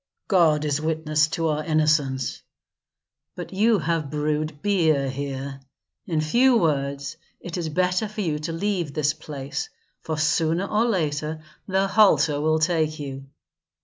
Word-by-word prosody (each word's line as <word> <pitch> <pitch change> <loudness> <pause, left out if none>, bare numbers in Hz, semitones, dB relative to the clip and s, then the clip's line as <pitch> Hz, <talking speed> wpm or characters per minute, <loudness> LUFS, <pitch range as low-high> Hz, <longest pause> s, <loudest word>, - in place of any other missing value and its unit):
"God 160 -6 +3
is 145 0 0
witness 155 -1 +1
to 165 0 -1
our 155 0 -1
innocence." 150 -4 +1 0.9
"But - - -7
you 215 +3 +3
have 165 -3 -1
brewed 150 0 -2
beer 160 -9 +2
here. 135 0 -5 0.5
In 160 -2 0
few 240 +11 +4
words, 140 -4 -1 0.2
it 175 - -7
is 170 -3 -2
better 180 +6 +1
for 210 +1 -5
you 155 -6 -1
to 155 +2 -4
leave 170 -4 -2
this 155 -1 +1
place, 140 -3 -6 0.3
for 160 -1 -3
sooner 160 +3 +1
or 215 +3 +1
later 155 -6 -1 0.2
the 190 0 +2
halter 160 -8 +4
will 155 +1 +2
take 155 -1 +1
you. 135 -2 -7
155 Hz, 145 wpm, -24 LUFS, 150-175 Hz, 0.9 s, few